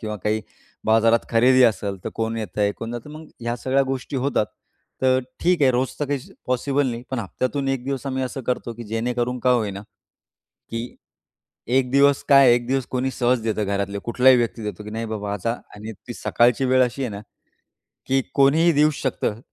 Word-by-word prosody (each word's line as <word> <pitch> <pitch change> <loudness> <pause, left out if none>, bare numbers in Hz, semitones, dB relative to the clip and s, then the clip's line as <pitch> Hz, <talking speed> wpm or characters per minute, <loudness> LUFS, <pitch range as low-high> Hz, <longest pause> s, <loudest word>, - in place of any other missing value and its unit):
किंवा 110 -2 -4
काही 110 +1 +1 0.4
बाजारात 115 +1 +3
खरेदी 125 +3 +5
असेल, 105 -4 +1
तर - - -2
कोण 115 0 -2
येतंय, 105 -1 -1
कोण 115 +2 -7
जातं. 120 +5 -7
मग 155 +1 -10
ह्या 120 0 -2
सगळ्या 130 +3 +1
गोष्टी 135 +1 -4
होतात. 130 -4 0 0.6
तर 130 0 +4 0.2
ठीक 175 -3 +2
आहे, 130 - +6
रोज 125 +1 +1
तर - - +2
काही 140 0 -1 0.3
पॉसिबल 135 +3 +1
नाही. 115 0 -5
पण 130 - -2
हप्त्यातून 130 +6 -2
एक 135 -2 -1
दिवस 135 0 -3
आम्ही 130 -1 -2
असं 130 +1 -5
करतो, 125 -1 -2
की 120 +1 -8
जेणेकरून 120 +3 -2
का 125 - +2
होईना, 105 -5 0 0.9
की 115 +1 -5 0.7
एक 125 +1 +1
दिवस 140 +1 +4
काय 140 -3 +7
एक 120 0 -1
दिवस 135 -1 0
कोणी 130 +1 -1
सहज 125 -2 +1
देतं, 110 -1 -1
घरातले 100 0 -2
कुठलाही 125 +2 +5
व्यक्ती 115 -1 -1
देतो, 105 0 -6
की 105 - -8
नाही 115 +1 -4
बाबा 105 -1 -3
आता 105 +4 -1 0.2
आणि 110 +2 -7 0.2
ती 120 - -5
सकाळची 120 +3 +2
वेळ 130 0 +4
अशी 125 +3 -4
आहे 125 - -2
ना, 100 0 -6 0.9
की 135 0 +2
कोणीही 155 +5 +5
देऊ 150 +1 +4
शकतं 115 -4 -1
125 Hz, 190 wpm, -23 LUFS, 115-135 Hz, 0.9 s, काय